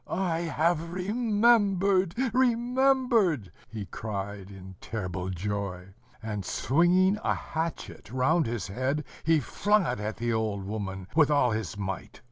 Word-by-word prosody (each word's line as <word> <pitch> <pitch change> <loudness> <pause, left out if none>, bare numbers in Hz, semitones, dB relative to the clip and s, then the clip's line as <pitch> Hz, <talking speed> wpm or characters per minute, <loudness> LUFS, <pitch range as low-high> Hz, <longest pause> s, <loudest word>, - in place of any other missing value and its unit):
"I 175 -4 -1
have 165 0 0
remembered, 200 -2 +2 0.2
remembered!" 245 - +2 0.2
he 110 -3 -6
cried 100 0 -5
in 95 -1 -11
terrible 95 -4 -4
joy; 95 0 -4 0.3
and, 105 -3 -3
swinging 180 - +3
a - - +1
hatchet 160 -10 -5
round 140 +5 +2
his 115 -1 -3
head, 130 +9 -1 0.2
he 160 0 +4
flung 205 - +1
it 125 -7 -2
at 105 +1 -4
the 120 +1 -1
old 110 -3 -1
woman 95 -2 -5
with 155 -2 +5
all 145 -5 +3
his 110 -1 -3
might. 95 -2 -5
140 Hz, 130 wpm, -28 LUFS, -, 0.3 s, with